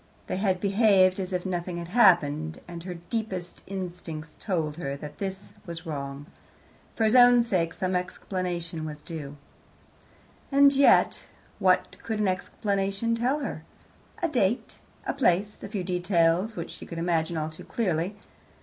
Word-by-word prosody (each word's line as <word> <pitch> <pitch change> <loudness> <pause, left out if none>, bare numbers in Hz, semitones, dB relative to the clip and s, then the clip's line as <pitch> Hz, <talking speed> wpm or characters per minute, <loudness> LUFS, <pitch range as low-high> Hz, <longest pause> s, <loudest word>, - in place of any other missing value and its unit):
They - - -3
had 190 -2 +1
behaved 195 -2 +4
as 185 -1 -3
if 180 0 -2
nothing 175 -1 -2
had 170 0 -6
happened, 160 -7 +4
and 170 -1 -7
her 180 +1 -6
deepest 185 0 -4
instincts 175 -5 -6
told 160 -6 -2
her 140 -5 -3
that 145 +1 -9
this 195 0 -6
was 170 0 -6
wrong. 140 -2 -5 0.7
For 225 - 0
his 220 +2 +4
own 245 -1 +8
sake, 180 -7 0
some 185 +1 -2
explanation 180 -2 -3
was 155 -1 -5
due. 150 -2 -8 1.1
And 280 0 +6
yet 275 0 +4 0.3
what 185 -3 +2
could 220 -2 -3
an 210 - +2
explanation 195 +3 -1
tell 250 +6 +1
her? - - -4 0.6
A - - +4
date, 240 - 0 0.3
a - - -1
place, 205 -5 +1
a - - -6
few 200 -3 -3
details, 180 +2 +2
which 170 - -5
she - - -10
could 170 - -7
imagine 165 -1 0
all 155 0 -1
too 155 - -11
clearly. 185 -3 -1
180 Hz, 155 wpm, -27 LUFS, 165-205 Hz, 1.1 s, own